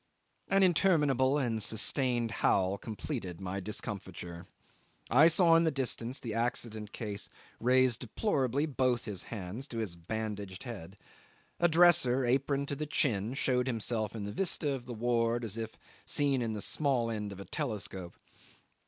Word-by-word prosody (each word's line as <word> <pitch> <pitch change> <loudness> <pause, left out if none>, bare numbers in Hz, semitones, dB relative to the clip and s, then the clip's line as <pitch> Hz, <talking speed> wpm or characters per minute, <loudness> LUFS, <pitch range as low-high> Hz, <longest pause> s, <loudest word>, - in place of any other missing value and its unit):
An 195 0 +3
interminable 150 -7 +3
and 115 -6 -1
sustained 120 +2 +1
howl 95 -2 +1
completed 110 - -5
my 95 0 -4
discomfiture. 95 -4 -6 0.6
I 145 +7 +7
saw 170 0 +5
in 165 - +5
the 165 - +3
distance 130 -2 -2
the 115 -3 -5
accident 115 -2 -2
case 105 -3 -5 0.3
raise 130 0 +3
deplorably 135 - 0
both 130 -5 0
his 100 -5 -5
hands 110 +5 -5
to 115 - -7
his 105 -6 -2
bandaged 100 +1 -5
head; 100 -7 -8 0.6
a 175 - +5
dresser, 155 -7 +5
aproned 140 +3 +1
to 140 - -2
the 150 +2 -4
chin 115 -5 0
showed 125 -2 +1
himself 115 -3 0
in 110 - -4
the 100 - -4
vista 160 - +1
of 125 -3 -6
the 125 - -5
ward, 120 +1 +1
as 105 -2 -3
if 110 -1 -5 0.3
seen 140 -3 +3
in 115 -2 -2
the 105 - -2
small 130 -6 0
end 105 -2 -4
of 100 - -9
a 100 - -8
telescope. 100 - -4
120 Hz, 155 wpm, -31 LUFS, 105-135 Hz, 0.6 s, I